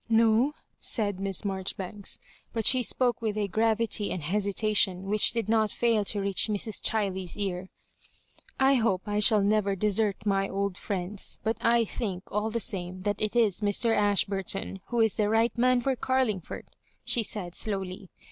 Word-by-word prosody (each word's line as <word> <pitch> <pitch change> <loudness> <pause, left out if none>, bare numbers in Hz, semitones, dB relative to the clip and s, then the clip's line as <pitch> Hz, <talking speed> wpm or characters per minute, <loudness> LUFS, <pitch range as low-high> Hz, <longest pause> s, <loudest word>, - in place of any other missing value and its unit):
" - - -40
No,'' 230 +5 +3 0.2
said 205 -5 -1
Miss 195 -2 -2
Maijoribauks— 195 0 -4 0.4
but 225 -2 -2
she 255 -1 +5
spoke 245 0 +1
with 215 -2 -2
a 205 -1 0
gravity 220 +1 +1
and 180 - -4
hesitation 200 +1 +1
which 205 +2 +4
did 230 -3 -2
not 220 -1 +2
fail 230 -3 +1
to 205 - -1
reach 195 +1 +2
Mrs. 215 +1 0
Chiley's 190 -4 0
ear 190 -2 -3 0.3
— - - -30
" - - -26
I - - +5
hope 190 -5 0
I 205 0 -1
shall 210 -1 +5
never 205 -1 +1
desert 210 +1 +1
my 195 -1 +1
old 200 -1 -2
friends; 190 +1 -3
but 220 +1 -1
I 230 0 +3
think 195 -4 -5
all 210 +2 -1
the 230 +1 -2
same 185 -4 -3
that 205 0 -2
it 215 +2 -1
is 220 -4 +2
Mr. 210 +3 +2
Ashburton 195 -1 0
who 240 -1 0
is 220 -2 +2
the 210 -2 0
right 225 +2 +2
man 250 0 +3
for 265 +2 0
Carlingford," 255 -8 -2 0.3
she 240 - +5
said, 200 -5 -6
slowly. 195 -2 -3
210 Hz, 175 wpm, -27 LUFS, 195-225 Hz, 0.4 s, she